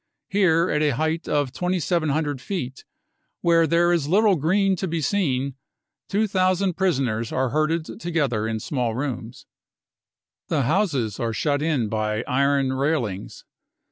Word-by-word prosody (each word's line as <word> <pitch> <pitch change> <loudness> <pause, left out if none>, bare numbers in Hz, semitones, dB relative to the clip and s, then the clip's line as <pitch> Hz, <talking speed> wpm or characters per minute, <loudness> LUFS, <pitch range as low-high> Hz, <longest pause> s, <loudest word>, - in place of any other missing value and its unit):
Here, 180 -4 +3
,at 150 - +1
a 150 -4 +2
height 160 +4 -1
of 145 -3 0
2,700 155 -5 -1
feet, 130 -7 -5 0.6
where 165 -1 +4
there 170 +2 +3
is 160 -5 0
little 200 +4 +4
green 190 +5 +2
to 190 - -2
be 165 -1 -2
seen, 140 -6 0 0.6
2,000 190 -2 +1
prisoners 130 - 0
are 130 -1 0
herded 155 - -1
together 140 - -1
in 110 -1 -2
small 120 -2 -2
rooms. 125 -3 -5 0.5
" - - -69
The 150 -4 +1
houses 140 - 0
are 115 -3 -1
shut 145 +4 0
in 150 -8 0
by 110 +1 -1
iron 140 0 +2
railings. 130 -8 -2
150 Hz, 140 wpm, -23 LUFS, 130-175 Hz, 0.6 s, where